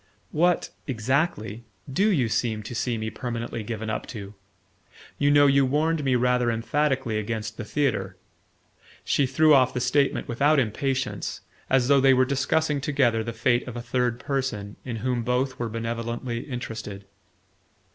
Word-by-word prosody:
"What 175 +3 +2 0.2
exactly 120 - -1 0.3
DO 200 +8 +3
you 135 - +2
seem 110 -1 -1
to 110 - -7
see 120 0 -1
me 110 0 -3
permanently 120 -3 -4
given 110 +1 -5
up 110 - -3
to? 100 -3 -8 0.9
You 145 - +3
know 145 0 +6
you 140 0 +5
warned 150 +4 +1
me 130 -2 +2
rather 125 0 +2
emphatically 120 0 0
against 110 0 -4
the 115 - -6
theatre." 100 -8 -1 0.9
She 140 - +2
threw 155 +4 +4
off 130 -3 +4
the - - 0
statement 135 +3 +1
without 140 +6 +3
impatience, 130 +2 -1 0.3
as 130 -2 +3
though 140 -1 +5
they 135 0 +6
were 130 0 +4
discussing 140 +2 0
together 130 -6 +1
the 115 - -4
fate 120 +2 +1
of 125 - -6
a 120 - -4
third 120 -1 0
person 130 -8 -3
in 120 -3 -4
whom 125 -2 0
both 125 +2 -1
were 120 -1 -2
benevolently 115 +1 -3
interested. 110 -5 -6
125 Hz, 155 wpm, -25 LUFS, 115-140 Hz, 0.9 s, know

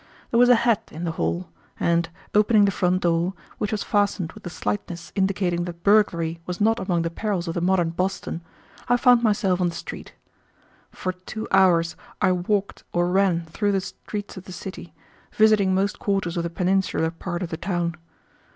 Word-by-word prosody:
There 235 - +3
was 245 0 +6
a 245 - +8
hat 230 -4 +2
in 160 +3 -7
the 170 - -1
hall, 175 +2 -2 0.3
and, 170 -1 +1 0.2
opening 210 0 +5
the 200 - +2
front 185 0 +1
door, 170 +2 +1 0.2
which 210 - -1
was 215 -2 -1
fastened 200 -5 0
with - - -14
a - - -3
slightness 170 - -4
indicating 185 -3 0
that 170 -1 -8
burglary 170 -6 +3
was 180 -1 -4
not 225 +2 +3
among 175 -3 0
the 165 - -2
perils 190 -2 -2
of 165 - -2
the 170 - -2
modern 175 -2 +2
Boston, 180 -1 -2 0.5
I 245 - +5
found 245 -1 +5
myself 205 -5 +2
on 175 - +2
the 170 - -7
street. - - -8 0.7
For 185 - -3
two 185 +4 -7
hours 175 -3 +4 0.2
I 190 - +3
walked 195 +3 -1
or 175 0 +1
ran 185 -3 +2
through 205 +5 -1
the 195 - +1
streets 205 +1 -7
of 185 - -9
the - - -9
city, 175 -3 -8 0.4
visiting 215 -3 +4
most 200 +2 0
quarters 195 -4 -1
of 170 - 0
the 170 - -3
peninsular 180 -2 0
part 175 +1 -4
of 170 - -4
the 160 - -4
town. 175 -1 -1
185 Hz, 190 wpm, -24 LUFS, 170-205 Hz, 0.7 s, a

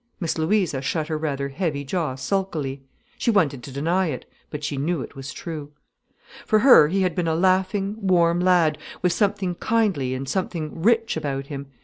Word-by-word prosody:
Miss 170 -5 -1
Louisa 165 -4 +1
shut 155 +3 -2
her 155 - -1
rather 140 -3 -2
heavy 145 -2 -2
jaw 150 -2 -2
sulkily. 140 -2 -2 0.4
She - - +1
wanted 160 - +2
to 135 - -9
deny 170 +7 0
it, 135 -5 -4 0.2
but 150 -1 -6
she 150 -1 -2
knew 150 +2 -1
it - - -11
was 135 +2 -7
true. 155 -3 -7 0.7
For 215 - +3
her 215 - +7
he 190 +4 +1
had 180 -2 +1
been 175 -2 -1
a 160 - +1
laughing, 190 +3 +1
warm 175 -4 +3
lad, 175 -4 +3 0.2
with 180 -1 +3
something 200 -2 0
kindly 180 - 0
and 135 +1 -5
something 165 -1 -3
rich 230 +3 +2
about 140 -3 -3
him. 140 0 -6
165 Hz, 185 wpm, -23 LUFS, 140-190 Hz, 0.7 s, her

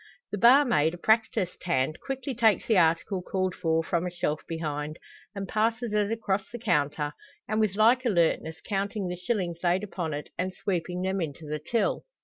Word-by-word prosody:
The 205 - -2
barmaid, 235 - +5
a - - -10
practised 220 -2 +1
hand, 155 -3 0
quickly 270 0 -4
takes 225 -3 +3
the 225 - +2
article 170 +3 +2
called 185 0 -1
for 165 -2 0
from 170 +1 -1
a - - -1
shelf 170 -4 -2
behind, 155 -2 -4 0.4
and 195 -1 -4
passes 225 +2 0
it 210 0 +1
across 205 -3 -1
the 240 - -6
counter, 150 -8 0 0.3
and 215 +1 0
with 215 -3 +1
like 235 +4 +4
alertness 170 -7 +1
counting 200 -1 -2
the 180 - -3
shillings 180 -3 -2
laid 180 +3 +2
upon 175 -7 -3
it, 145 - -7
and 185 +1 -2
sweeping 180 -2 -2
them 190 0 0
into 155 -1 -5
the 150 +1 -3
till. 225 +9 0
185 Hz, 180 wpm, -27 LUFS, 165-215 Hz, 0.4 s, barmaid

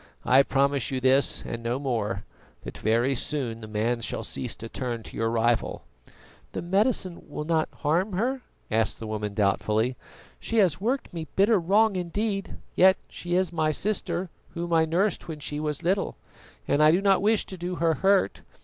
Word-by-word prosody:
I 130 +2 +6
promise 140 -1 +1
you 130 - -1
this 130 +2 +3
and 115 - -5
no 120 +2 -1
more, 115 -7 -2 0.4
that - - -8
very 115 +5 +2
soon 125 -4 -2
the 110 - -8
man 110 +3 -1
shall 115 - -3
cease 120 +2 -4
to 115 - -8
turn 120 -1 -4
to - - -10
your 115 0 0
rival." 115 0 0 0.7
"The - - -4
medicine 190 0 +1
will 145 - -4
not 160 0 +1
harm 175 +7 0
her?" 250 +8 0 0.3
asked 110 -1 +1
the 115 - -6
woman 105 -1 -4
doubtfully. 110 +4 +1 0.4
"She 230 - -3
has 185 -4 +3
worked 250 +2 -1
me 165 -2 -5
bitter 205 +2 +4
wrong 200 +4 +3
indeed, 195 +3 -2 0.2
yet 190 +1 +6
she 175 0 -3
is 185 -1 +1
my 155 -2 +1
sister, 180 -1 -2 0.2
whom 170 0 -3
I 160 -1 +5
nursed 175 +5 0
when 160 -2 -6
she 145 0 -4
was 150 +1 -3
little, 190 +3 0 0.5
and 145 - +2
I 155 - +7
do 170 +4 +4
not 195 -1 +3
wish 215 +1 +3
to 190 - -6
do 180 0 -4
her 165 -1 +2
hurt. 195 - +2
155 Hz, 185 wpm, -26 LUFS, 120-190 Hz, 0.7 s, I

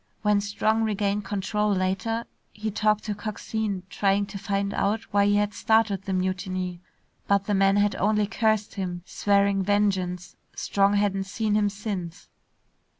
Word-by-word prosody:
When 210 -1 +3
Strong 215 +2 0
regained 205 -1 0
control 210 +1 -1
later, 195 +5 -1 0.3
he 215 0 -4
talked 215 +1 +1
to 210 - -2
Coxine, 210 -1 -3
trying 200 0 +1
to 200 0 -8
find 200 -1 -1
out 215 +3 0
why 200 0 +4
he 205 - +3
had 205 0 +1
started 220 -4 +2
the 195 - -3
mutiny. 185 -1 -2 0.5
But 200 -1 +3
the 205 - 0
man 195 0 +4
had 205 0 +3
only 210 +1 +2
cursed 215 0 0
him, 180 -3 -4
swearing 200 -1 +2
vengeance. 190 -3 0 0.2
Strong 200 0 +2
hadn't 200 -1 +1
seen 210 +2 -1
him 210 -1 +3
since. 200 -4 -6
200 Hz, 150 wpm, -26 LUFS, 195-210 Hz, 0.5 s, why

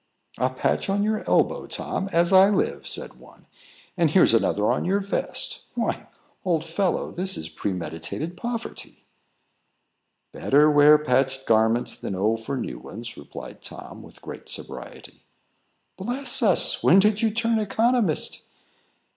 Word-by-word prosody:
"A 130 - +2
patch 130 +8 -1
on 200 +1 +1
your 215 0 -1
elbow, - - +1
Tom, 195 - -4
as 170 +2 +2
I 190 +1 +7
live!" 205 - -1
said - - -5
one; - - -19 0.5
"and 170 -4 +2
here's 165 -5 +4
another 105 -2 +2
on - - -1
your 195 +3 +1
vest. 200 0 -2
Why, - - -2 0.4
old 165 -4 0
fellow, 175 +3 -1
this 190 +2 +1
is 80 - -6
premeditated 90 - -4
poverty." 235 +3 -6 1.3
"Better 150 +2 +3
wear 145 +1 +7
patched 135 -2 0
garments 110 +2 +2
than 95 - -5
owe 105 +4 +1
for 115 +5 -5
new - - -5
ones," 115 +3 -8
replied 70 - -10
Tom, - - -10
with - - -16
great - - -9
sobriety. - - -7 0.8
"Bless 250 +7 +2
us! 200 -7 +2
when 185 - +5
did 210 +2 +3
you 225 - +3
turn 225 +1 0
economist?" 220 -3 0
170 Hz, 140 wpm, -24 LUFS, 125-205 Hz, 1.3 s, I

